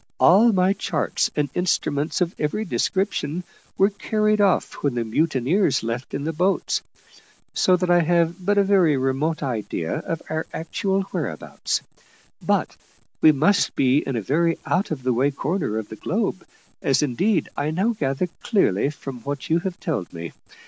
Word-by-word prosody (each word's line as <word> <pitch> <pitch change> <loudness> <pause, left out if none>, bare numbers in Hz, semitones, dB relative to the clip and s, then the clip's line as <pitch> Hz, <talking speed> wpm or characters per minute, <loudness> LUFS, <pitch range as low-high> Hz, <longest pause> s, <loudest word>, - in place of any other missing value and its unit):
All 215 +7 +6
my 190 -1 +3
charts 175 -6 -1
and 150 -1 +1
instruments 155 -3 0
of 175 0 +1
every 155 +9 -1
description 180 - -1 0.3
were 195 +2 +4
carried 215 +1 +1
off 200 -2 +2
when 140 -4 0
the 120 -1 -1
mutineers 145 - +1
left 115 +3 -4
in 140 - -3
the 160 +2 -2
boats, 180 +5 +1 0.7
so 185 - +4
that 180 0 0
I 175 - +6
have 170 +2 +1
but 205 +2 +1
a 200 - +5
very 185 -7 +3
remote 135 +5 0
idea 110 -10 -2
of 165 - -4
our 160 0 -3
actual 195 +3 -1
whereabouts, 135 - -3 0.6
but - - 0 0.5
we 155 - +8
must 160 +7 +2
be 135 +1 +3
in 135 -3 -3
a 115 - -1
very 165 - +1
out 185 +4 0
of 145 -5 -4
the 130 -1 +1
way 130 +4 +2
corner 145 - -2
of 110 -2 -4
the 110 - -7
globe, 195 - -2 0.4
as 135 +1 +2
indeed 160 - +1
I 145 +1 -1
now 185 +8 +1
gather 135 -4 -1 0.2
clearly 140 - +2
from 135 -3 -7
what 140 +5 -5
you 165 - +4
have 180 0 -5
told 135 - -3
me. 85 -1 -7
160 Hz, 170 wpm, -23 LUFS, 135-190 Hz, 0.7 s, we